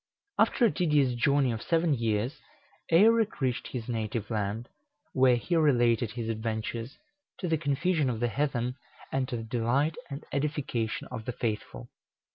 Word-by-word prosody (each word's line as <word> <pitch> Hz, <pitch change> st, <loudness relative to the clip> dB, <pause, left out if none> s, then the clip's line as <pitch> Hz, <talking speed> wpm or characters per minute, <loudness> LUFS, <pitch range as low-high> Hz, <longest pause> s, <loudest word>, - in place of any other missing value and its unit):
After 240 Hz, -, +4 dB
a 220 Hz, -, +4 dB
tedious 150 Hz, -8 st, +2 dB
journey 135 Hz, +2 st, +2 dB
of 115 Hz, -1 st, -4 dB
seven 165 Hz, -2 st, +2 dB
years, 115 Hz, +4 st, -1 dB, 0.5 s
Eirek 220 Hz, +5 st, +5 dB
reached 130 Hz, -3 st, -1 dB
his 120 Hz, -4 st, -5 dB
native 115 Hz, -1 st, -3 dB
land, 105 Hz, +2 st, -2 dB, 0.5 s
where 130 Hz, -1 st, +5 dB
he 145 Hz, +9 st, -1 dB
related 120 Hz, -7 st, +3 dB
his 115 Hz, -2 st, -4 dB
adventures, 115 Hz, +2 st, -3 dB, 0.4 s
to 180 Hz, -, -3 dB
the 165 Hz, -, +2 dB
confusion 155 Hz, 0 st, +1 dB
of 115 Hz, -3 st, -2 dB
the 120 Hz, 0 st, +1 dB
heathen, 125 Hz, -2 st, -1 dB, 0.3 s
and 135 Hz, -1 st, 0 dB
to 120 Hz, -, -2 dB
the 115 Hz, -, -5 dB
delight 120 Hz, +7 st, +1 dB, 0.2 s
and 140 Hz, 0 st, -7 dB
edification 140 Hz, -6 st, -2 dB
of 115 Hz, -3 st, -6 dB
the -, -, -2 dB
faithful. 105 Hz, -, -4 dB
125 Hz, 155 wpm, -29 LUFS, 115-150 Hz, 0.5 s, Eirek